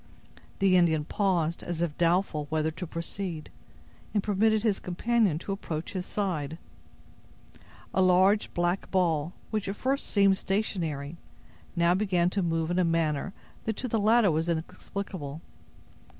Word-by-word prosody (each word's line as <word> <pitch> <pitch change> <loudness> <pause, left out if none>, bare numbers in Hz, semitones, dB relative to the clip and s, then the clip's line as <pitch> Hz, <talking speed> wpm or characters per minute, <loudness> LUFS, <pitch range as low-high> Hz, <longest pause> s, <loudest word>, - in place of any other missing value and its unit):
The 195 -1 +4
Indian 160 -4 +3
paused, 170 -4 0
as 175 -2 -4
if 170 -3 -1
doubtful 170 -3 +1
whether 155 0 0
to 180 +3 -6
proceed, 165 0 -5 0.6
and 205 - +2
permitted 215 +1 +2
his 210 -4 +1
companion 205 -1 +1
to 185 - -5
approach 165 -5 -4
his 185 -1 -4
side. 160 -7 -2 1.4
A 190 - +3
large 185 +3 +4
black 175 +2 0
ball, 170 -3 +1 0.2
which 215 -3 -1
at 195 - -3
first 270 +5 -1
seemed 195 -2 +4
stationary, 170 -7 -2 0.6
now 170 0 +4
began 180 -3 +1
to 200 - 0
move 165 -1 0
in 175 - +1
a - - +4
manner 165 0 0 0.3
that 220 -1 -2
to 255 - -2
the 225 -2 0
latter 215 -1 +4
was 160 +2 0
inexplicable. 160 -2 -4
180 Hz, 145 wpm, -28 LUFS, 165-200 Hz, 1.4 s, The